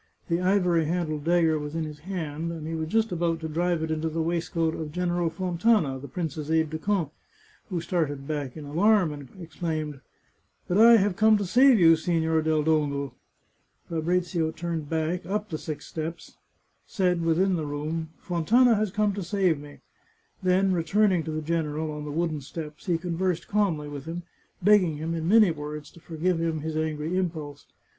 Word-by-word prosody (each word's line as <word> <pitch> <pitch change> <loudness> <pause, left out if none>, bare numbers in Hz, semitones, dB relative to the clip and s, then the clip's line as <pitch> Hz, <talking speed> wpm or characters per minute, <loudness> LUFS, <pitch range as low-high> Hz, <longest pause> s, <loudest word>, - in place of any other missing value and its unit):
The 170 +1 +1
ivory 180 -3 +2
handled 155 -2 -2
dagger 165 -2 +3
was 150 +1 -6
in 165 - -1
his 150 -1 -7
hand, 165 -2 -4
and 160 -2 -6
he 160 - -4
was 160 -1 -2
just 225 +3 +1
about 170 -1 0
to 160 - -3
drive 170 +1 0
it 160 - -2
into 160 +1 -1
the 160 +1 -3
waistcoat 165 0 0
of 155 -2 -5
Gen 180 +2 -1
eral 175 -1 0
Fontana, 175 - +1
the 140 - -8
prince's 155 0 -4
aide 160 -1 +2
de 160 - -3
camp, 175 -5 -1 0.6
who 180 -3 -2
started 155 -5 -2
back 145 -3 -4
in 150 - -7
alarm, 180 +2 +3
and 145 -3 -10
exclaimed, 155 -3 -4 0.3
" - - -43
But 180 +3 +1
I 230 +1 +9
have 200 -2 +1
come 220 +1 +5
to 205 - -2
save 250 +5 +5
you, 165 -2 +7
Signor 160 -1 +1
del 155 -1 +1
Dongo! 145 -4 0 0.4
" - - -41
Fabrizio 170 0 0
turned 165 -2 -4
back, 165 +3 -1
up 210 +2 -2
the 155 - -3
six 150 -2 -6
steps, 160 +1 -6 0.5
said, 180 -4 +1
within 180 +3 +2
the 155 -3 -3
room, 155 +3 -3
" - - -34
Fontana 230 +9 +4
has 215 -1 +1
come 210 +1 +1
to 200 - -4
save 180 -3 +1
me," 145 0 -12 0.6
then, 185 +1 +3
returning 185 +2 +2
to 160 - -3
the 155 0 -3
general, 155 -1 -1
on 150 0 -6
the 150 - -5
wooden 160 -1 -1
steps, 150 +4 -8
he 175 -2 +2
conversed 175 0 -2
calmly 190 -8 0
with 145 -2 -7
him, 170 +2 -5 0.4
begging 185 -6 +4
him, 160 +2 -3
in 165 -1 -2
many 215 -3 +6
words, 150 -1 -7
to - - -16
forgive 165 +1 -1
him 165 -2 -1
his 160 +1 -3
ang^ 155 -1 -1 0.2
impulse. 155 -6 -3
165 Hz, 195 wpm, -26 LUFS, 155-180 Hz, 0.6 s, I